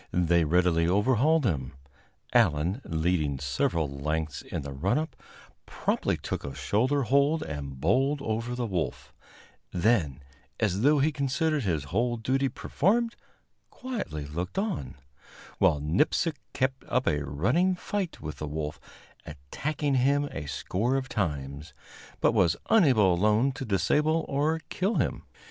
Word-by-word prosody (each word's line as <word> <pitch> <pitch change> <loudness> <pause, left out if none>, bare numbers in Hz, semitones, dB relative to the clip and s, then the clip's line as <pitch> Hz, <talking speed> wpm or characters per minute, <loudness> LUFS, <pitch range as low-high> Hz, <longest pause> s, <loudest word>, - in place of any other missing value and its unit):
They 85 -1 +3
readily 85 0 +3
overhauled 130 - +3
him. 75 - -1 0.6
Allan, 85 - +2
leading 80 -3 0
several 70 +4 0
lengths 75 +1 -3
in - - -5
the 70 0 -6
run 90 - 0
up, 155 -3 -3 0.5
promptly - - -1
took - - -4
a 70 -1 -6
shoulder 125 - +1
hold 140 +5 +2
and 70 -4 -6
bowled 135 - +2
over 115 -1 -2
the 125 -1 -2
wolf; 85 - -3 0.6
then, 85 - +1 0.4
as 100 -3 +1
though 145 +4 +5
he 145 +3 +3
considered 150 +2 0
his 80 -6 0
whole 120 - 0
duty 130 +4 0
performed, 225 - 0 0.5
quietly 215 - -5
looked 85 - -5
on, 195 - -2 0.6
while 75 - +4
Nipsic 100 - +1 0.2
kept 130 +1 -1
up 125 - +1
a 75 -2 +1
running 120 - +1
fight 190 -1 -3
with 75 0 -6
the 75 - -5
wolf, 75 0 -4 0.5
attacking 135 - -3
him 140 +3 +3
a 75 - -6
score 100 - -1
of 135 -1 -2
times, 75 -6 -3 0.4
but - - +4
was 90 -4 +3
unable 130 - +5
alone 105 +8 +3
to 135 0 -6
disable 150 +10 +1
or 150 +3 0
kill 195 +5 0
him. - - -1
105 Hz, 140 wpm, -28 LUFS, -, 0.6 s, though